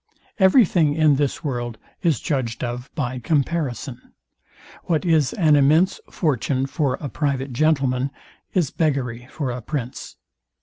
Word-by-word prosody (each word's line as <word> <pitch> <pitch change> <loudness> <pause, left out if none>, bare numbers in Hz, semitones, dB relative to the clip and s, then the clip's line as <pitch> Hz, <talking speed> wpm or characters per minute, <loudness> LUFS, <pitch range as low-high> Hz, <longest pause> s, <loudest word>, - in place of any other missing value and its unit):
Every 195 +5 +6
thing 155 -5 +2
in 155 -3 +4
this 145 +3 -1
world 120 -5 -3 0.2
is 165 -8 +2
judged 130 -6 -2
of 125 +1 -4
by 130 -4 -2
comparison. 140 -3 -2 0.7
What 165 +1 0
is 160 -5 +3
an 155 -5 +4
immense 155 +6 +4
fortune 135 - 0
for 135 -2 0
a 145 - -4
private 140 -2 -2
gentleman 135 -2 +1 0.4
is 175 -7 +1
beggary 125 -6 -1
for 140 -5 -3
a 120 +1 -5
prince. 130 0 -5
140 Hz, 135 wpm, -22 LUFS, 125-155 Hz, 0.7 s, Every